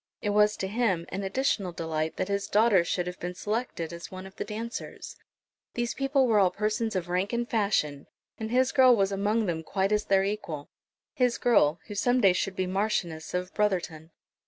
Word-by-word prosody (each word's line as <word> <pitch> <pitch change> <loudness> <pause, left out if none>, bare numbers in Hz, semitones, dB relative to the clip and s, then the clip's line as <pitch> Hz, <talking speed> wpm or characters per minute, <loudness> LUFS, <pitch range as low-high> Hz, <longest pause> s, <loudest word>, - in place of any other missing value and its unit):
It 205 - -1
was 210 0 +3
to 190 - -2
him 195 -5 0
an 190 - -4
additional 200 -2 0
delight 160 -1 -3
that - - -1
his 200 0 -1
daughter 210 -4 +4
should 175 +1 -1
have 180 0 -6
been 180 +1 -5
selected 210 -6 -3
as 170 0 -8
one 185 0 -8
of 190 - -12
the - - -3
dancers. 230 +2 -6 0.6
These 240 0 -1
people 275 0 +2
were 220 -4 +3
all 190 -2 +5
persons 215 +3 -1
of 180 -2 -2
rank 180 +5 -1
and 235 0 -1
fashion, 195 -11 0 0.3
and 220 0 -4
his 255 +2 +2
girl 255 -3 +6
was 195 -2 +1
among 210 +3 +1
them 165 -3 -2
quite 195 +4 -1
as 210 0 +1
their 195 -1 +3
equal, 195 -8 -4 0.4
his 250 -2 +1
girl, 170 -10 +3
who - - -8
some 245 +5 +2
day 195 -6 +5
should 190 +1 -2
be 185 - -1
Marchioness 180 -5 -2
of 180 +1 -3
Brotherton. 175 -6 -1
200 Hz, 200 wpm, -28 LUFS, 180-225 Hz, 0.6 s, girl